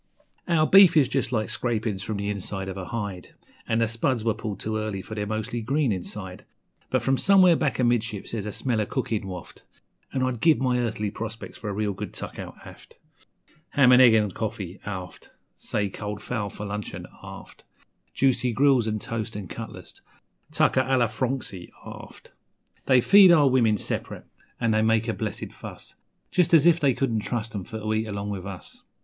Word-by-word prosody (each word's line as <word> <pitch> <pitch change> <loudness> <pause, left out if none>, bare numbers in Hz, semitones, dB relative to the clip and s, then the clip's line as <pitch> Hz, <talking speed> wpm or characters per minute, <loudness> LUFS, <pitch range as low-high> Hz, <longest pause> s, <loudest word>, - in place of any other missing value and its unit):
Our 165 -3 +3
beef 190 -2 +7
is 140 -4 +5
just 130 -3 -1
like 110 -3 -1
scrapin's 110 -4 -1
from 105 +1 -4
the 100 +1 -2
inside 95 -1 -4
of 95 - -5
a 95 -2 -6
hide, 100 -5 -6 0.3
And 115 0 +1
the 115 - +3
spuds 115 +1 -1
were 115 -1 +1
pulled 105 -2 -6
too 110 0 -2
early, 105 -3 -3
for - - -9
they're 105 -1 -3
mostly 110 +2 -3
green 135 +2 +1
inside; 95 0 -5 0.5
But - - 0
from 135 0 +2
somewhere 185 -1 +6
back 145 -7 0
amidships 120 -4 0
there's 105 -3 -4
a - - -3
smell 115 0 -1
o' 105 - -2
cookin' 110 -6 -2
waft, 90 -2 -9 0.5
An' 130 - -1
I'd 130 -3 -2
give 160 -2 +5
my 125 -2 +1
earthly 105 -3 -2
prospects 115 +1 -7
for 105 - -5
a - - -3
real 105 0 -1
good - - -7
tuck - - -7
out - - -7
aft - - -14 0.8
Ham 130 -3 +5
an' 125 0 +8
eggs 120 -3 +7
'n' 105 -2 +2
coffee, 100 -3 -5
aft, 95 -3 -7 0.3
Say, 105 - -2
cold 105 +1 -6
fowl 110 -3 -3
for 105 - -8
luncheon, 105 0 -5 0.2
aft, - - -11 0.5
Juicy 125 -2 +2
grills 135 -2 +3
an' 110 -1 -1
toast 115 0 -4
'n' 100 -4 -7
cutlets - - -9 0.5
tucker 130 - +3
a 135 0 +3
lor 120 -3 +2
frongsy, 115 -6 -3 0.2
aft. - - -11 0.6
They 130 -2 +5
feed 195 +5 +8
our 150 -4 +6
women 120 -5 +3
sep'rate, - - -4 0.4
an' 115 - +1
they 110 0 +2
make 110 +1 +2
a 115 - 0
blessed 105 -2 -5
fuss, - - -10 0.4
Just 170 -2 +4
as 155 -1 +5
if 170 -1 +5
they 140 -5 +2
couldn't 120 -5 0
trust 115 +1 -3
'em 100 -3 -4
for 110 - -7
to 110 0 -2
eat 110 +1 -1
along 100 0 -4
with 95 -2 -5
us! 95 -3 -9
110 Hz, 195 wpm, -25 LUFS, 105-130 Hz, 0.8 s, an